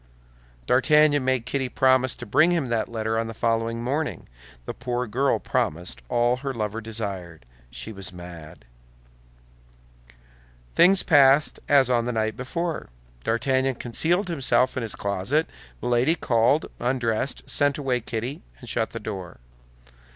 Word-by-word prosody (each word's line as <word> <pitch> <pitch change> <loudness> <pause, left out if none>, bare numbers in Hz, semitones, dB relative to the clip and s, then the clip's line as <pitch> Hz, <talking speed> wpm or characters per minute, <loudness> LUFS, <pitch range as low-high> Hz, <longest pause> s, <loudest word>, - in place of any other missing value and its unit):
D'Artagnan 145 - +4
made 130 -2 0
Kitty 130 0 -2
promise 130 -1 +3
to 120 - -9
bring 155 +10 +4
him 165 -8 0
that 115 -2 -1
letter 110 -1 -1
on 115 - -2
the 115 - -7
following 115 0 -1
morning. 145 +5 -2 0.4
The - - -4
poor 125 +1 -3
girl 130 +5 +1
promised 85 0 -2
all 120 +1 +2
her 135 0 -4
lover 110 0 -3
desired; 100 - -5 0.2
she 110 - -8
was 95 -3 -6
mad. 85 -6 -11 2.1
Things 190 - +5
passed 140 +1 +5
as 140 -3 +5
on 120 -1 +2
the 125 - -1
night 110 -1 -1
before. 165 +6 -4 0.3
D'Artagnan 130 +3 +1
concealed 170 - 0
himself 135 -5 +2
in 130 - -2
his 115 -2 -3
closet; 100 - 0 0.4
Milady 125 +6 +2
called, 120 +2 +2
undressed, 125 0 -1
sent 145 -1 +2
away 130 -4 -1
Kitty, 120 +5 -4 0.2
and - - -12
shut - - -1
the - - -6
door. 95 -5 -7
125 Hz, 140 wpm, -24 LUFS, 110-135 Hz, 2.1 s, Things